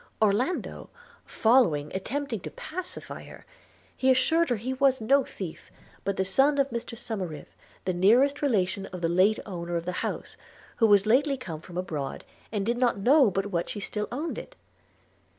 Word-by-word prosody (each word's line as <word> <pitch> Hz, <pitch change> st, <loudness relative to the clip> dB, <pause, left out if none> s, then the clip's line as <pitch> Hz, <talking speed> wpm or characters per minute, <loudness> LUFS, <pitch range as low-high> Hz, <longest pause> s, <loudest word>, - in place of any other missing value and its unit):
Orlando, 220 Hz, -, 0 dB, 0.4 s
following, 220 Hz, -, +3 dB
attempted 240 Hz, +3 st, -3 dB
to -, -, -6 dB
pacify 360 Hz, +3 st, -7 dB
her: -, -, -13 dB, 0.5 s
he 260 Hz, -, +1 dB
assured 320 Hz, +6 st, +3 dB
her 245 Hz, -, +2 dB
he 240 Hz, +5 st, -3 dB
was 265 Hz, 0 st, +3 dB
no 270 Hz, +5 st, +3 dB
thief, 180 Hz, -9 st, -8 dB, 0.3 s
but 200 Hz, 0 st, -2 dB
the 190 Hz, -, +1 dB
son 270 Hz, +9 st, +3 dB
of 275 Hz, -2 st, +1 dB
Mr 235 Hz, 0 st, -5 dB
Somerive, 185 Hz, -11 st, -6 dB, 0.3 s
the 185 Hz, -, 0 dB
nearest 240 Hz, +11 st, +4 dB
relation 195 Hz, -7 st, 0 dB
of 180 Hz, -2 st, -8 dB
the 165 Hz, -, +2 dB
late 185 Hz, +5 st, +3 dB
owner 175 Hz, -3 st, -5 dB
of 170 Hz, 0 st, -2 dB
the 180 Hz, -, -1 dB
house, -, -, -4 dB, 0.4 s
who 225 Hz, -, +5 dB
was 205 Hz, -1 st, +5 dB
lately 275 Hz, +5 st, +3 dB
come 165 Hz, -11 st, -7 dB
from 175 Hz, +1 st, -10 dB
abroad, 155 Hz, -7 st, -4 dB, 0.3 s
and 205 Hz, -3 st, -1 dB
did 235 Hz, +2 st, 0 dB
not 245 Hz, -4 st, +2 dB
know 255 Hz, +5 st, +5 dB
but 195 Hz, +1 st, -2 dB
what 170 Hz, -2 st, -1 dB
she 210 Hz, -, -4 dB
still 210 Hz, +1 st, -3 dB
owned 295 Hz, +7 st, -3 dB
it. -, -, -11 dB
220 Hz, 175 wpm, -27 LUFS, 185-265 Hz, 0.5 s, who